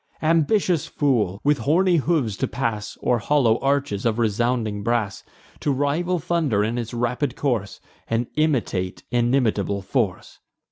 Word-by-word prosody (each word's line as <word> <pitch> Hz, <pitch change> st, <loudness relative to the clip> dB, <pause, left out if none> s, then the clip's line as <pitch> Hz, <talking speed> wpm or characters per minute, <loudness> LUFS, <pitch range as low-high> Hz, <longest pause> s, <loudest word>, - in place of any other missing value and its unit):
Ambitious 165 Hz, +1 st, +2 dB
fool! 110 Hz, -10 st, 0 dB
with 145 Hz, 0 st, +2 dB
horny 175 Hz, +4 st, +3 dB
hoofs 145 Hz, -, 0 dB
to -, -, -1 dB
pass 115 Hz, -4 st, -3 dB
O'er 120 Hz, -1 st, +2 dB
hollow 120 Hz, -1 st, +2 dB
arches 140 Hz, -7 st, 0 dB
of 115 Hz, -2 st, +1 dB
resounding 115 Hz, -1 st, 0 dB
brass, 110 Hz, -2 st, -1 dB, 0.4 s
To 145 Hz, -, 0 dB
rival 145 Hz, +7 st, 0 dB
thunder 155 Hz, -10 st, 0 dB
in 115 Hz, +3 st, -1 dB
its 115 Hz, -2 st, -5 dB
rapid 125 Hz, +3 st, -1 dB
course, 120 Hz, -8 st, -2 dB, 0.3 s
And 115 Hz, +2 st, 0 dB
imitate 120 Hz, -12 st, -1 dB
inimitable 120 Hz, -5 st, +1 dB
force! 105 Hz, -4 st, -2 dB
120 Hz, 135 wpm, -23 LUFS, 110-145 Hz, 0.4 s, horny